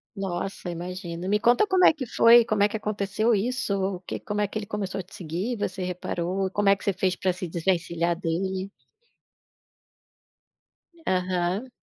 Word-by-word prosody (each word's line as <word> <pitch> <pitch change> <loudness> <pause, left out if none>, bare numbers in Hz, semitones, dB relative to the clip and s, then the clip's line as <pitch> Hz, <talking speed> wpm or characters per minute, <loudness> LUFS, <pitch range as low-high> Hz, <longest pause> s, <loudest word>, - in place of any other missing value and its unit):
Nossa, 195 -1 -4
imagina, 175 0 -5
me 210 +1 +2
conta 240 - +4
como 375 -2 +4
é - - +9
que 290 -5 -5
foi, 230 +1 +6
como 215 -3 0
é 205 - +6
que 220 - -3
aconteceu 210 +2 0
isso, 245 +2 0 0.2
o - - -8
que 185 - -5
como 210 0 -3
é 205 - +2
que 215 +2 -4
ele 205 - -7
começou 200 -2 -3
a - - -4
te 185 - -15
seguir, 180 +8 -3
você 190 -2 -3
reparou, 180 +1 -2
como 205 0 +2
é 200 - +6
que - - -14
você 200 -3 +1
fez 185 0 0
para 185 -1 0
se 180 0 -5
desvencilhar 170 0 0
dele? 190 +2 -2 2.4
Aham. 185 +4 0
195 Hz, 175 wpm, -26 LUFS, 180-210 Hz, 2.4 s, é